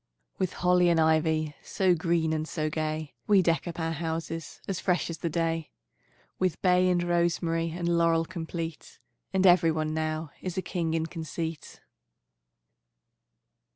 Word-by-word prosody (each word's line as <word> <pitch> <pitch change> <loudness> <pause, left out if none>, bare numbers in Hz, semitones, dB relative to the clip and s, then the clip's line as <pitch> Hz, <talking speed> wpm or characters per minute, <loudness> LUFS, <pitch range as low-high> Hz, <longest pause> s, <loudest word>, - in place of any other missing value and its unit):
With 185 -3 0
holly 180 0 +3
and 170 -1 +3
ivy 160 -1 +2
So 190 -2 +2
green 165 -1 +1
and 155 0 -2
so 155 -2 -2
gay, 155 -1 -3
We 200 -3 +5
deck 165 +1 +1
up 170 0 -5
our 165 0 -1
houses 165 0 -4
As 190 -3 -2
fresh 180 -2 0
as 165 - -7
the 170 - -1
day; 165 -1 -1 0.7
With 185 -4 0
bay 180 0 +4
and 175 -1 +2
rosemary 170 -1 +1
And 170 +1 -3
laurel 165 -1 +3
complete; 165 -2 -6 0.3
And 190 0 +2
every 175 -2 +6
one 155 -1 -1
now 155 -1 -2
Is 185 0 -5
a 185 - 0
king 165 -2 -1
in 160 0 0
conceit. 165 -1 -6
165 Hz, 155 wpm, -28 LUFS, 160-175 Hz, 0.7 s, every